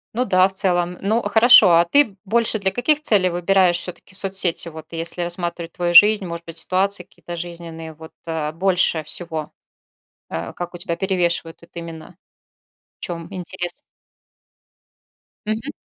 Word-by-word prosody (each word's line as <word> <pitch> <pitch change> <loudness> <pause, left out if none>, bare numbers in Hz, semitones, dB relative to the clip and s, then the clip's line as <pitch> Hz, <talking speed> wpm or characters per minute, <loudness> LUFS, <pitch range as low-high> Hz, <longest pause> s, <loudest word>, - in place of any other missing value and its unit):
Ну 250 +2 0
да, 185 -3 +4
в 195 - -11
целом. 180 -2 -1
Ну, 220 +4 0
хорошо. 225 -4 +7
А 170 0 +5
ты 220 +2 +2
больше 220 +1 +1
для 195 -1 0
каких 295 +7 +1
целей 200 -10 +2
выбираешь 175 0 +2
всё-таки 180 +1 -6
соцсети? 190 -3 +2
Вот, 160 -1 -11
если 165 +1 -3
рассматривать 175 -1 -4
твою 175 0 -2
жизнь, 210 +1 +8
может 170 -1 -7
быть, 165 0 -6
ситуации 185 +3 0
какие-то 175 -1 -10
жизненные, 165 -2 -8
вот, 160 +1 -13 0.2
э, 160 -2 -3
больше 175 -1 +1
всего, 160 -1 -4 0.8
э, - - -5
как 175 0 -7
у - - -7
тебя 170 -1 -3
перевешивают 175 -3 -1
тут 170 - -20
именно? 165 0 -9 0.8
В - - -81
чём 170 -2 -6
интерес? 175 -2 -7 1.6
Мгм. 225 +7 -3
175 Hz, 150 wpm, -20 LUFS, 170-195 Hz, 1.6 s, жизнь